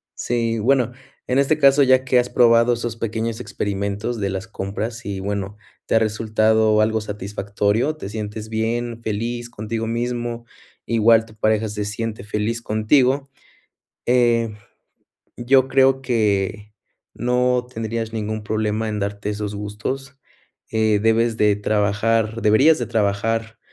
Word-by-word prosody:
Sí, 115 -1 -1
bueno, 125 +1 +2 0.4
en 130 +2 +2
este 140 +2 +2
caso, 140 -1 +5
ya 130 -1 +4
que 130 -1 +3
has 125 0 -1
probado 115 0 +4
esos 115 -1 -4
pequeños 115 0 -3
experimentos 100 +3 -3
de 100 -1 -1
las 95 +2 -4
compras 110 +3 -5
y 100 -2 -4
bueno, 100 0 -3 0.3
te - - 0
ha - - +6
resultado 110 0 +2
algo 110 +1 +1
satisfactorio. 105 +5 -1
Te 100 - -7
sientes 105 0 -6
bien, 115 +1 -2
feliz 115 +2 -3
contigo 110 +1 -4
mismo. 120 0 -3 0.4
Igual 115 0 +4
tu 110 -1 -17
pareja 110 0 +1
se 105 0 -3
siente 110 0 -4
feliz 105 +2 -2
contigo, 130 +6 +2 0.8
eh, 120 -2 +2 0.8
yo 130 +2 +3
creo 135 0 +3
que 105 -4 -1 0.4
no 125 +1 +1
tendrías 115 0 -3
ningún 110 -1 -4
problema 110 0 -1
en 105 -1 -3
darte 100 +1 -3
esos 105 0 -4
gustos. 110 +7 -5 0.5
Eh, 110 -1 +2
debes 115 +1 +2
de 105 -1 +3
trabajar 110 +2 0
deberías 135 +10 +5
de 120 - -3
trabajar, 110 +1 -1
110 Hz, 135 wpm, -21 LUFS, 105-120 Hz, 0.8 s, ha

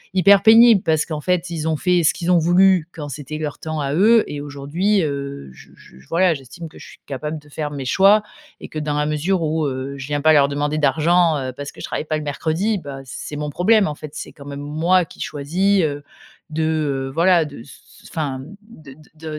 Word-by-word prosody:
hyper 200 +1 +6
pénible 225 -2 +7
parce 160 -2 +1
qu'en 155 -2 -5
fait, 180 0 -1
ils 160 -1 -3
ont 160 - +1
fait 180 +2 +1
ce - - +3
qu'ils 180 +1 -1
ont 175 - +5
voulu, 175 0 +4
quand 145 -2 -7
c'était 145 +2 -6
leur 150 -2 -5
temps 155 -1 -4
à 140 0 -2
eux 220 +5 +5
et 145 -1 -6
aujourd'hui, 150 +8 -1
heu, 140 - -5
je - - -16
je 65 - -18
j - - -19
voilà, 175 +1 +3
j'estime 135 +6 -10
que - - -16
je - - -12
suis - - -15
capable 150 +3 -5
de 150 0 -20
faire 150 0 -4
mes 140 -2 -6
choix 195 +9 +5 0.4
et - - -10
que, 155 - -8
dans 150 -1 -2
la 150 - +1
mesure 165 +5 0
où, 155 0 0
heu, 135 +1 -4
je 135 +1 -7
viens 145 -1 -2
pas 155 +1 +5
leur 140 -2 +5
demander 145 +2 -1
d'argent, 160 +3 +3
heu, 130 -1 -4
parce 145 +2 -7
que - - -17
je - - -4
travaille - - -4
pas 155 0 -1
le 155 - -5
mercredi, 165 +8 -1
bah, 140 -3 -8
c'est 145 +3 -7
mon 150 0 -3
problème, 205 +7 +3
en 150 - -4
fait. 150 -1 -9
C'est - - -7
quand 140 - -14
même 140 0 -7
moi 165 +5 +1
qui - - -14
choisis, 180 +7 0
heu, 145 -1 -2 0.5
de, 160 +1 -2
heu, 145 -4 -1
voilà, 170 0 +4
de 145 -4 -10
s 140 - -15 0.2
s - - -14
enfin, 145 -5 -3
mmh, 165 +10 -11
de 155 -11 -14 0.2
de 160 0 -9
155 Hz, 240 wpm, -20 LUFS, 145-175 Hz, 0.5 s, pénible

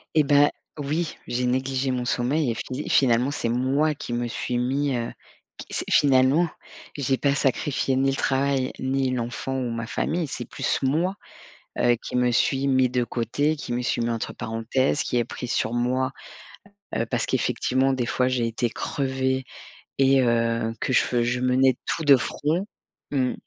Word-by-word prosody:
Et 155 - +5
bah, 145 0 +4 0.3
oui, 155 +3 -2
j'ai 125 +1 -1
négligé 130 +1 0
mon 125 -1 -2
sommeil 125 +3 +1
et - - -3
fi 130 +5 -5
finalement, 125 0 +3
c'est 120 - -2
moi 135 +6 +1
qui 120 - -6
me 120 0 -1
suis 120 +1 -3
mis, 135 +2 0
heu, 115 -1 -2 0.5
qui - - -10
s'est - - -2
finalement, 140 +4 +4 0.5
j'ai 135 -2 0
pas 140 +1 +2
sacrifié 135 0 0
ni 135 +1 +2
le - - -2
travail, 135 -1 +1
ni 130 0 0
l'enfant 125 +2 -3
ou 125 -2 -2
ma 115 0 -4
famille. 165 +6 -1
C'est - - -5
plus - - -2
moi, 165 +8 +1 0.6
heu, 120 0 +4
qui - - -3
me 125 0 +3
suis 135 +3 +1
mis 130 -2 +3
de 125 0 +1
côté, 145 +7 -1
qui 130 - -6
me 120 - 0
suis 120 - 0
mis 115 - 0
entre 115 -1 -3
parenthèses, 120 +5 0
qui - - -2
ai 120 - +2
pris 125 +1 -7
sur 110 0 0
moi, 130 +2 0 0.8
heu, 115 - 0
parce - - -1
qu'effectivement, 130 +1 +1
des 130 -2 -1
fois, 125 +2 +1
j'ai 125 -2 0
été 115 +1 -1
crevée 130 +1 -1 0.6
et 135 0 +5
heu, 115 -1 +1
que - - -1
je - - +5
fe 120 -1 0
je 120 +1 0
menais 130 +1 +3
tout 165 - -2
de 140 -2 +8
front. 155 - -1 0.4
Mmh. 130 -3 +1
130 Hz, 180 wpm, -24 LUFS, 120-140 Hz, 0.8 s, de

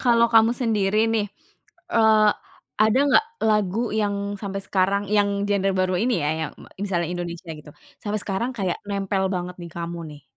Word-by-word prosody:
kalo 235 -2 +4
kamu 225 0 +6
sendiri 210 -4 +1
nih, 220 -2 +1 0.7
eee, 220 -1 +5 0.6
ada 220 +3 +4
nggak 285 +10 +5 0.2
lagu 210 -1 +1 0.2
yang 205 -1 0 0.3
sampai 195 -1 -3
sekarang 195 +1 +1
yang 205 -1 +4 0.2
genre 195 -1 +1
baru 185 0 +1
ini 250 +2 +1
ya, 150 - +1
yang 160 - -3
me - - -14 0.2
misalnya 175 -4 -1
Indonesia 175 -1 -6
gitu, 150 0 -13 0.3
sampe 210 0 -2
sekarang 210 +5 -2
kayak 185 -3 0
nempel 195 -1 -1
banget 180 0 -4
di 170 - -7
kamu 170 0 -4
nih? 145 -2 -13
200 Hz, 170 wpm, -23 LUFS, 180-215 Hz, 0.7 s, kamu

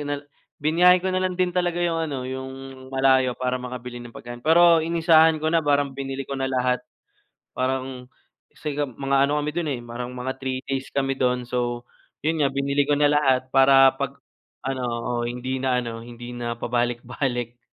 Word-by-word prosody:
na 145 0 -2 0.4
biniyahe 175 +4 +5
ko 185 - -5
na 185 - +1
lang 185 -1 -1
din 180 -1 +1
talaga 175 -1 0
yung 165 -1 0
ano, 140 -2 -3
yung 130 0 -5 0.4
malayo, 130 -1 +3
para 130 0 -1
makabili 125 -1 -7
ng 120 - -10
pagkain. 120 0 -9
Pero 170 +1 +6
inisahan 160 -1 +4
ko 155 - -3
na, 165 - +4
parang 145 -2 +1
binili 135 0 -4
ko 140 - -4
na 135 0 -1
lahat. 125 -1 +1 0.8
Parang 130 -1 -3 0.4
kasi 150 -2 -5
nga 145 - 0
mga 135 +2 -2
ano 150 +1 0
kami 150 0 -2
dun, 170 -3 -1
eh, 130 - -2
parang 120 +1 -6
mga 125 +1 -4
3 130 -1 -2
days 135 0 -3
kami 135 -1 0
dun, 125 -1 0
so, 120 0 -2 0.4
yun 160 0 +1
nga 140 - +3
binili 140 +1 +1
ko 145 0 +1
na 145 - +5
lahat 130 -3 +2
para 135 0 +7
pag 140 0 -3 0.5
ano 130 -1 -2
oo, 120 +1 -3 0.2
hindi 130 +2 -4
na 130 -1 +2
ano, 115 -2 -5
hindi 120 +1 -9
na 120 -1 -4
pabalik-balik. 120 0 -2
135 Hz, 185 wpm, -24 LUFS, 125-145 Hz, 0.8 s, para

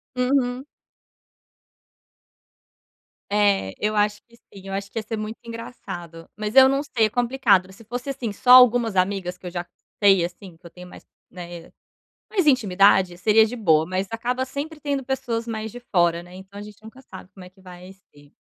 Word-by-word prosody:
Uhum. 250 0 0 2.6
É, 200 - +1
eu 215 +1 -1
acho 210 0 0
que 235 - -21
sim. 195 -3 -16
Eu 195 - -6
acho 195 0 -5
que 225 - -3
ia - - -6
ser 220 0 -5
muito 215 +1 -6
engraçado, 190 -8 -9
mas 215 +3 -4
eu 265 0 +9
não 275 +1 0
sei, 230 -6 +1
é - - 0
complicado. 235 -6 +1
Se 225 +4 -16
fosse, 245 +5 -6
assim, 250 -5 -4
só, 250 +4 +1
algumas 245 -4 +7
amigas 185 -1 -1
que 180 - -17
eu - - -6
já 175 0 -5 0.4
sei, 195 -3 +5
assim, 175 -1 -11
que 175 - -26
eu - - -10
tenho 180 +1 -13
mais - - -14 0.2
né, 175 -2 -10 0.6
mais 375 -7 0
intimidade. 195 -7 +3
Seria 220 +3 +4
de 245 +3 -6
boa, 160 -8 +3
mas 185 +1 -2
acaba 245 +3 -2
sempre 300 +3 -7
tendo 280 -3 -3
pessoas 245 -3 -3
mais 220 -1 -5
de 245 - -10
fora, 175 -6 +1
né. 180 +1 -15
Então 190 +2 -12
a - - -7
gente 210 0 -13
nunca 240 +5 -14
sabe 190 -5 -12
como 190 -2 -12
é 180 - -14
que 190 +1 -25
vai 180 0 -12 0.2
ser. 145 0 -20
210 Hz, 190 wpm, -23 LUFS, 185-245 Hz, 2.6 s, eu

